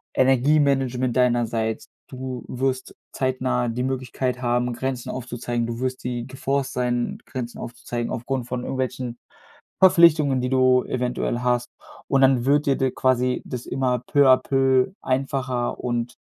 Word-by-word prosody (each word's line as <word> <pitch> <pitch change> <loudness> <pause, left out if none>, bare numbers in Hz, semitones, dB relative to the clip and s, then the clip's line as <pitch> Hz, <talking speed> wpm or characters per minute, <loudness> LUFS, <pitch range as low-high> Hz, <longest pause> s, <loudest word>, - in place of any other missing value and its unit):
Energiemanagement 130 -2 +2
deinerseits. 120 -3 0 0.2
Du 130 -2 -6
wirst 130 0 -2 0.2
zeitnah 130 -2 -1
die 120 +2 -2
Möglichkeit 130 -1 -2
haben, 120 0 0
Grenzen 125 0 -3
aufzuzeigen, 120 -1 -3
du 115 0 -5
wirst 130 0 -3
die 120 -1 -3
geforced 135 +1 -2
sein, 120 -1 -1
Grenzen 120 -2 -6
aufzuzeigen, 120 0 -5
aufgrund 125 0 -3
von 125 0 -3
irgendwelchen 125 -2 -3 0.6
Verpflichtungen, 170 -7 +5
die 125 - -1
du 130 -1 +4
eventuell 125 -1 -2
hast. 125 -1 +1 0.4
Und, 135 0 +3
dann 130 -2 +4
wird 145 +3 +3
dir 140 - +3
d 130 -1 +1
quasi 125 0 +1
das 125 -1 -6
immer 125 -2 0
peu 140 +3 +3
à 130 0 +7
peu 135 +3 +2
einfacher 130 -2 -1
und 120 -1 -2
125 Hz, 140 wpm, -23 LUFS, 120-130 Hz, 0.6 s, à